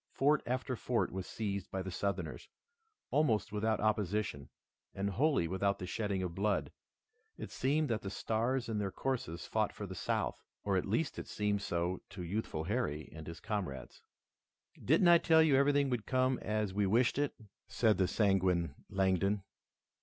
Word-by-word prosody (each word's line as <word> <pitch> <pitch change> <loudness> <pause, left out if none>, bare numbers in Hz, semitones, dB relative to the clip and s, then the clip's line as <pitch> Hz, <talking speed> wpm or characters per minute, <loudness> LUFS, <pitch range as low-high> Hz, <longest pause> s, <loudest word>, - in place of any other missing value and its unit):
Fort 145 +2 +3
after 130 +1 -1
fort 120 +1 0
was 95 0 -5
seized 100 -3 -3
by 95 -1 -3
the 95 - -5
Southerners, 100 +3 -3 0.6
almost 125 -8 +2
without 110 +1 0
opposition 105 -7 0 0.5
and 100 +1 -1
wholly 135 - +2
without 100 +3 0
the 90 - -5
shedding 95 +1 -2
of 90 -2 -3
blood. 100 +3 0 0.7
It - - -7
seemed 150 +3 +1
that 110 -2 0
the 100 - -4
stars 115 +5 -1
in 110 -2 -1
their 100 -1 -1
courses 95 -9 -3
fought - - 0
for - - -6
the - - -7
South, - - -2 0.2
or 100 -1 +1
at 95 - 0
least 135 +9 0
it - - -7
seemed 105 -1 0
so 85 -1 -1
to 95 - -8
the 85 - -5
youthful 90 -5 -2
Harry 90 -6 -2
and 80 -1 -9
his 85 - -7
comrades. 90 -12 -4 0.8
"Didn't 165 +7 +4
I 170 0 +8
tell 160 -1 +5
you 150 -4 +4
everything 140 0 +3
would 120 -4 -2
come 130 0 +2
as 105 -2 -1
we 100 0 +1
wished 120 +7 +3
it?" 145 -1 0 0.3
said 110 -5 +2
the 95 - +4
sanguine 95 -7 +2 0.2
Langdon. 95 +1 +1
105 Hz, 175 wpm, -34 LUFS, 95-125 Hz, 0.8 s, I